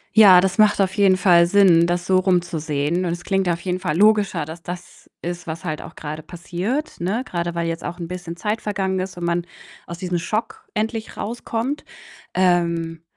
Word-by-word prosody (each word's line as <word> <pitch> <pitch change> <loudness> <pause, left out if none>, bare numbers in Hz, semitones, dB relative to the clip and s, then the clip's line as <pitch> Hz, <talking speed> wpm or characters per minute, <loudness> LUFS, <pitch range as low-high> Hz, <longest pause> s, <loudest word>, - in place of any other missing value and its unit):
Ja, 195 -5 +9
das 190 +1 0
macht 210 -1 +4
auf 190 -1 0
jeden 195 -3 +4
Fall 175 -3 +5
Sinn, 175 -2 +5
das 175 +1 -1
so 190 - +4
rum 185 -1 +3
zu 170 -2 -5
sehen 155 +4 -1
und 170 - -1
es 175 0 -7
klingt 195 -1 0
auf 170 -1 0
jeden 180 0 -2
Fall 150 - -2
logischer, 210 -2 +3
dass 160 +2 -9
das 175 0 -9
ist, 175 +1 -5
was 160 0 -6
halt 155 -2 -3
auch - - -11
grade 155 +1 -6
passiert, 185 - -4
ne? 195 +8 -1
Grade 170 -6 -3
weil 170 0 -2
jetzt 165 0 -4
auch 175 +1 -5
'n 170 - -5
bisschen 175 -1 -6
Zeit 210 +4 -2
vergangen 190 -2 -1
ist 185 -1 -5
und 175 - -3
man 170 0 0 0.4
aus 170 0 -8
diesem 180 -2 -2
Schock 215 +6 -3
endlich 220 +1 -3
rauskommt. 235 +4 -3 0.5
Ähm, 170 -3 +1
180 Hz, 205 wpm, -21 LUFS, 170-195 Hz, 0.5 s, Ja